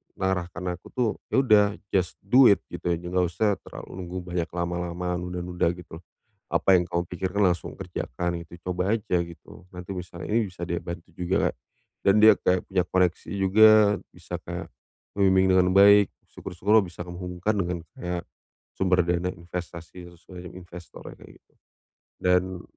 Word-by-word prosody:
mengarahkan 90 -1 -2
aku 90 - -16
tuh 125 -3 +1 0.2
ya - - +4
udah 105 -4 +6 0.3
just 90 -2 0
do 125 +7 +6
it 100 - +3
gitu, 85 0 -3
nggak 90 +2 -1
usah 100 +4 0
terlalu - - -10
nunggu 90 0 -6
banyak 85 -1 -1
lama-lama 90 +1 -3
nunda-nunda 90 -1 -2
gitu. 90 -2 -11 0.5
Apa 95 - +4
yang 90 - +3
kamu 85 0 -2
pikirkan 95 +3 -2
langsung 90 -2 -2
kerjakan 85 +6 -4
gitu. 85 +1 -14
Coba 90 +3 0
aja 100 -5 0
gitu. 85 +1 -13
Nanti 90 +1 -7
bisa 90 -1 -8
ini 110 +1 +1
bisa 90 -1 -7
dia 85 - -2
bantu 85 -1 -7
juga, 90 +3 0 0.5
dan 100 +2 +5
dia 110 0 +8
kayak 90 0 0
punya 95 -2 +1
koneksi 90 -1 0
juga 100 +3 +6 0.4
bisa - - -8
kayak - - -6 0.5
membimbing 95 -1 +4
dengan 90 0 +4
baik, 100 0 +7 0.2
syukur-syukur 105 +2 +1
bisa 90 -1 -9
kamu 90 0 -8
hubungkan 90 +3 -2
dengan 90 -2 -1 0.2
kayak 90 -1 -4 0.5
sumber 95 -1 +2
dana 90 +1 0
investasi 85 0 -8
sesuai 90 +1 -12
dengan 90 - -13
investor 85 -1 -11
kayak - - -16
gitu. - - -40 0.7
Dan 90 0 +1
90 Hz, 160 wpm, -26 LUFS, 85-95 Hz, 0.7 s, dia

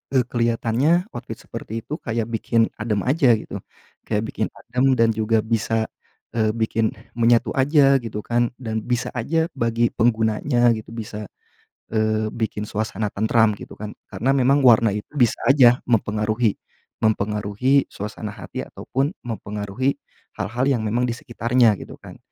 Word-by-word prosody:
eee, 130 - +5
kelihatannya 120 +8 +2
outfit - - -7
seperti 115 +1 -6
itu 150 +7 -5
kayak 115 0 -3
bikin 115 0 +1
adem 105 -2 -1
aja, 130 -3 +4
gitu, 110 - -6 0.5
kayak 105 -1 0
bikin 110 - -2
adem 130 +2 +1
dan 115 0 +5
juga 110 0 +1
bisa, 115 0 0 0.5
eee, 110 -2 +2
bikin 110 -1 0 0.2
menyatu 115 0 +4
aja, 140 0 +5
gitu, 110 -2 -5
kan, 120 +2 0
dan 110 -2 -3
bisa 125 0 -1
aja 160 +7 0
bagi 115 -1 +2
penggunanya, 120 +2 +2
gitu, 110 - -10
bisa, 110 -2 -6 0.7
eee, 110 0 +1
bikin 110 -2 -3
suasana 110 0 -2
tentram, 110 +1 +3
gitu, - - -11
kan, 105 0 -6 0.2
karena 135 +3 +1
memang 135 +2 +4
warna 115 -2 +6
itu 105 +1 -4
bisa 120 -6 +3
aja 130 -3 +6
mempengaruhi, 110 -1 +1 0.4
mempengaruhi 105 +5 +1
suasana 105 +1 -6
hati 90 -5 -6
ataupun 140 +6 -2
mempengaruhi 105 +2 -2 0.4
hal-hal 110 +5 -1
yang 130 -5 +2
memang 115 +3 0
di - - -1
sekitarnya, 120 -1 +2
gitu, - - -9
kan. - - -11
115 Hz, 145 wpm, -22 LUFS, 110-125 Hz, 0.7 s, warna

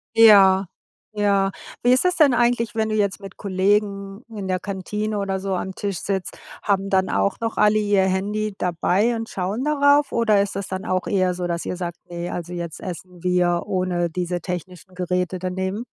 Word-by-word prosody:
Ja, 195 -4 +7 0.5
ja. 200 -2 +2 0.3
Wie 245 +1 +5
ist 260 - +3
es 360 0 +1
denn 290 -6 +5
eigentlich, 235 -2 +1
wenn 220 -1 0
du 215 - -1
jetzt 200 -1 0
mit 195 -1 -10
Kollegen 200 +2 0
in 205 -4 -6
der 185 0 0
Kantine 210 +2 -3
oder 195 -1 -2
so 195 -1 -2
am 190 +1 -4
Tisch 200 -4 -3
sitzt, 195 -2 -3 0.2
haben 195 -1 0
dann 190 -1 +2
auch 200 - 0
noch 225 -1 -2
alle 210 0 +4
ihr 205 -2 +2
Handy 205 +3 -1
dabei 185 +6 +1
und 225 0 -5
schauen 200 +7 -3
darauf, 290 -1 +3
oder 215 -4 +3
ist 200 -1 -3
das 200 - -4
dann 190 +2 -5
auch 185 -3 -1
eher 185 -2 +1
so, 175 0 -3
dass 170 0 -3
ihr 180 - -3
sagt: 175 -1 -4
„Ne, 175 0 -5
also 175 0 -5
jetzt 170 -2 -6
essen 180 0 -8
wir 180 -1 +2
ohne 185 -3 -1
diese 175 0 -3
technischen 180 +1 -7
Geräte 180 0 -1
dann 185 0 -4
eben?" 190 +5 -2
195 Hz, 195 wpm, -22 LUFS, 180-210 Hz, 0.5 s, Ja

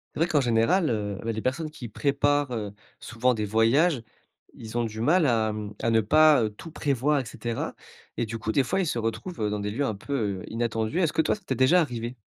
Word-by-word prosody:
C'est - - -5
vrai 165 - +4
qu'en 150 -4 +2
général, 125 +9 +2
heu, 105 -3 -2
et - - -11
bah, 115 - 0
les 110 0 -4
personnes 150 +6 -2
qui 150 -6 -8
préparent, 140 +3 +1
heu, 105 -4 -4 0.3
souvent 120 +2 0
des 105 -1 -2
voyages, 115 - +3 0.5
ils 110 0 -10
ont 120 - +1
du 110 -1 -4
mal 155 +5 +3
à 110 -3 +1
mmh, 105 -1 -6
à 115 - +2
ne 115 0 +4
pas 150 0 +5
tout 165 - -10
prévoir, 140 0 +1
et 130 - -4
cetera. 115 0 -4 0.4
Et - - 0
du 115 +1 -6
coup, 110 - -2
des 135 - +3
fois, 190 +10 -1
ils 185 - 0
se 135 - -1
retrouvent 115 - -3
dans 105 - -2
des 105 0 -3
lieux 135 +7 -1
un 110 - -1
peu 105 -4 -3
inattendus. 115 +4 -2
Est-ce 165 -4 +1
que - - +3
toi, - - +1
ça 210 - -15
t'est - - -1
déjà 130 +8 +5
arrivé? 120 -4 -4
120 Hz, 240 wpm, -26 LUFS, 110-145 Hz, 0.5 s, pas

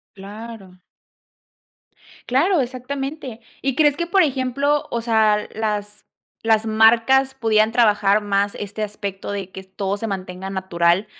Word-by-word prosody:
Claro. 200 -2 -11 1.4
Claro, 325 +7 +2
exactamente, 265 0 -5 0.2
¿y 270 -1 0
crees 295 0 +3
que, 340 - -2
por 380 +2 +3
ejemplo, 280 +1 0
o 235 - -1
sea, 220 -2 +2
las 210 -1 -3 0.4
las 225 -1 +2
marcas 230 +5 +4
podían 220 -3 +2
trabajar 210 -3 +3
más 200 -1 0
este 205 +1 -5
aspecto 200 -2 -5
de 195 -2 -5
que 190 - -8
todo 190 +1 -3
se 225 +2 -4
mantenga 190 -1 -5
natural, 185 0 +1
220 Hz, 130 wpm, -21 LUFS, 200-255 Hz, 1.4 s, marcas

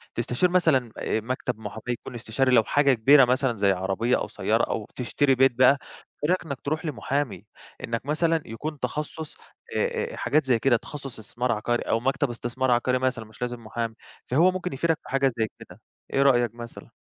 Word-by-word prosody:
تستشير 120 +9 +1
مثلًا 155 -10 +2
آآ - - -1
مكتب 125 0 -3
محاماة 110 0 -7
يكون 120 +1 -4
استشاري 120 +3 0
لو 115 -3 +6
حاجة 140 +3 +3
كبيرة 135 +4 +6
مثلًا 130 0 +1
زي 100 -2 +3
عربية 95 +6 0
أو - - -3
سيارة - - 0
أو - - -2
تشتري 135 +2 +1
بيت 135 +1 +5
بقى، 130 +3 +5 0.5
إيه 150 - +1
رأيك 185 +1 +2
إنك 140 -5 -6
ترُوح 155 +3 -2
لمحامي، 135 - -2 0.4
إنك 115 +1 -3
مثلًا 160 +2 +1
يكون 150 +7 -6
تخصُّص 150 +4 -5 0.4
آآ - - -1
آآ - - -7
حاجات 155 0 +1
زي 125 -3 +2
كده، 120 0 +3
تخصُّص 135 -1 -8
استثمار 120 +3 -2
عقاري 120 +2 0
أو 115 - 0
مكتب 135 +3 0
استثمار 120 +2 -2
عقاري 125 +1 +2
مثلًا 130 -3 -1
مش 110 +2 -18
لازم 120 -1 -4
محامي، 115 0 -4 0.3
فهو 165 +9 +4
ممكن 180 -2 -4
يفيدك 165 +4 +1
في - - -13
حاجة 135 0 +2
زي 110 - +2
كده، - - -13 0.3
إيه 135 - +3
رأيك 120 -4 +3
مثلًا؟ 120 0 -10
125 Hz, 190 wpm, -25 LUFS, 115-140 Hz, 0.5 s, لو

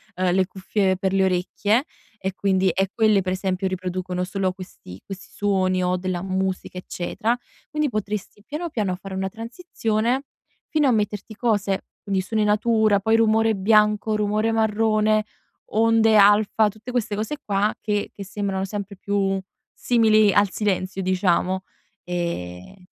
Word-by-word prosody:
uhm, 185 0 +1
le 185 0 +2
cuffie 190 0 0
per 190 0 -1
le 190 0 +3
orecchie, 200 - +1 0.3
e 190 0 -3
quindi 190 -1 +2
e, 190 +2 0
quelle 215 -3 +3
per 185 0 -2
esempio 190 0 -1
riproducono 185 -1 -3
solo 190 0 -1
questi 180 - -11
questi 195 0 -9
suoni, 185 -2 +1
o 180 0 +1
della 180 -1 -3
musica, 190 -1 -2
eccetera. 220 +7 -2 0.3
Quindi, 300 -1 0
potresti 210 -2 -4
piano, 320 +4 -4
piano 205 -7 -1
fare 195 +1 -9
una 190 0 -2
transizione, 230 - -2 0.5
fino 305 -3 +2
a - - +4
metterti 210 -1 -2
cose, 205 -5 0 0.2
quindi, 195 -2 0
suoni 215 +3 -1
natura, 215 -1 +3
poi 220 +3 +2
rumore 225 0 +3
bianco, 210 +2 +3
rumore 210 +1 +1
marrone, 215 -1 +2 0.5
onde 225 0 +4
alfa, 210 +1 +5
tutte 215 +4 -11
queste 235 -4 -1
cose 220 +8 -3
qua, 205 +1 +1
che 205 -1 -1
che 200 - -8
sembrano 195 -1 -2
sempre 200 0 -6
più 195 0 0 0.3
simili 215 -4 +4
al 205 -1 +4
silenzio, 195 -2 -1
diciamo, 185 0 +1 0.4
ehm 170 - -5
205 Hz, 145 wpm, -23 LUFS, 185-220 Hz, 0.5 s, alfa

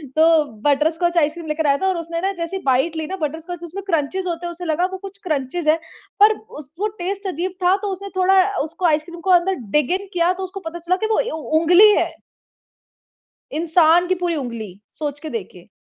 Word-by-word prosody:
तो 320 0 +5 0.2
butterscotch 320 +5 +2
ice cream 325 +1 +1
लेकर 305 0 -1
आया 280 0 +4
था 380 - +2
और 375 -2 +1
उसने 335 0 -4
न 390 - 0
जैसे 335 +3 -3
बाईट 270 +5 +2
ली 315 -1 -3
न - - -1
बटरस्कॉच 325 +3 -4
उसमें 360 +4 -7
क्रंचेस 340 +2 0
होते 345 0 -3
हैं 345 - -3
उसे 345 +1 -8
लगा 330 +2 +1
वो 380 - -4
कुछ 395 +1 -10
क्रंचेस 305 0 -2
है 310 +1 +5 0.4
पर 425 +2 +6 0.2
उस 285 -2 -12
वो 420 - +1
टेस्ट 390 +2 -3
अज़ीब 365 +1 -2
था। 360 +2 +5
तो 415 - -3
उसे 395 +1 -6
थोड़ा 375 +1 +5
अ, 405 +2 -1
उसको 325 +4 -4
आइस 310 -2 +3
क्रीम 340 +1 -10
को 380 - -3
अंदर 365 +2 +4 0.2
डिग 300 -1 +1
इन 400 - -11
किया 350 0 +2
तो 380 +1 -6
उसको 375 +1 -6
पता 345 +1 -8
चला 345 +2 0
कि - - 0
वो - - +2 0.2
उ 310 +4 +1
उँगली 360 +6 +7
है। - - +1 1.4
इंसान 330 +2 +4
की 370 - +2
पूरी 350 -2 -1
उँगली, 230 - -6
सोच 290 -2 -5
के 315 +1 -7
देखें। 185 - -7
340 Hz, 220 wpm, -21 LUFS, 310-370 Hz, 1.4 s, उँगली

